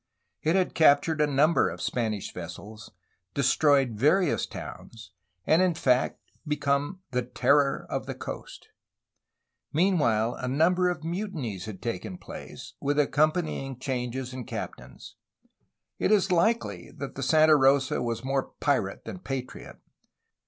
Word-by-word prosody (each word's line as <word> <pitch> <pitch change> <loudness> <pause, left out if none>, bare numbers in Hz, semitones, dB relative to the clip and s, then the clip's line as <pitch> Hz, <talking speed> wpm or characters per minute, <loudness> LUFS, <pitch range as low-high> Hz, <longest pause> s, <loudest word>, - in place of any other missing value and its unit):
It 160 +3 +1
had 185 -1 +1
captured 155 0 +4
a 150 - +4
num 145 +3 +3
ber - - +3
of - - -8
Spanish 110 -5 -2
vessels, 100 +6 -9 0.5
destroyed 140 -1 +3
various 150 - +2
towns, 110 -7 -10 0.3
and 160 +3 +4
in 180 -3 +2
fact 130 -4 +1 0.3
become 145 +4 -1
^'the 125 0 -1
terror 140 -1 +3
of - - -4
the - - -4
coast. - - -8
'^ - - -48 1.0
Meanwhile, 145 - +2
a 130 - -3
number 175 +7 +3
of 165 -3 -4
mutinies 165 - -4
had 110 -3 -8
taken 110 -5 -4
place, - - -10
with 145 +1 0
accompanying 150 -2 +1
changes 130 -1 -3
in 125 -2 -6
captains. - - -8 0.8
It - - +1
is 205 -3 +3
likely 220 +7 +1
that - - -6
the - - -6
Santa 155 -1 +5
Rosa 135 -2 +3
was 115 -1 -3
more 135 0 -2
pirate 120 -9 0
than 185 - -7
patriot. 135 -7 -6
140 Hz, 140 wpm, -27 LUFS, 125-160 Hz, 1.0 s, Santa